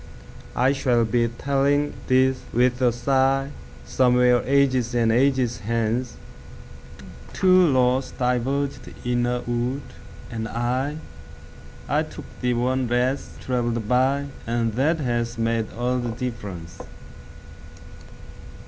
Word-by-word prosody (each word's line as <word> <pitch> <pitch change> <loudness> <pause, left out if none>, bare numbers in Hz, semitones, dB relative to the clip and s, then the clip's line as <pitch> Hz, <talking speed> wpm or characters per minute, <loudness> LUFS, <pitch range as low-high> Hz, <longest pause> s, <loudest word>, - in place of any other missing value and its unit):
I 130 +3 +3
shall 120 -4 +2
be 115 +1 +1
telling 140 +4 0
this 130 0 +3
with 125 +1 +2
a 125 - +5
sighSomewhere 130 -1 +1
ages 130 -3 +2
and 115 -1 +3
ages 125 -1 +2
hence:Two 120 - -2
roads 130 0 +2
diverged 130 +3 -2
in 120 0 +1
a 125 0 -1
wood, 120 +3 -2 0.5
and 110 -1 -4
I—I 125 +7 -4
took - - -8 0.2
the 125 -1 +1
one 125 +1 0
less 125 +3 -1
traveled 120 -3 -1
by, 130 +4 +2 0.2
And 115 -1 0
that 145 +8 +1
has 120 -2 -1
made 115 -1 -1
all 125 +4 -1
the 120 -1 -3
difference. 110 -8 -6
125 Hz, 105 wpm, -23 LUFS, 120-130 Hz, 0.5 s, a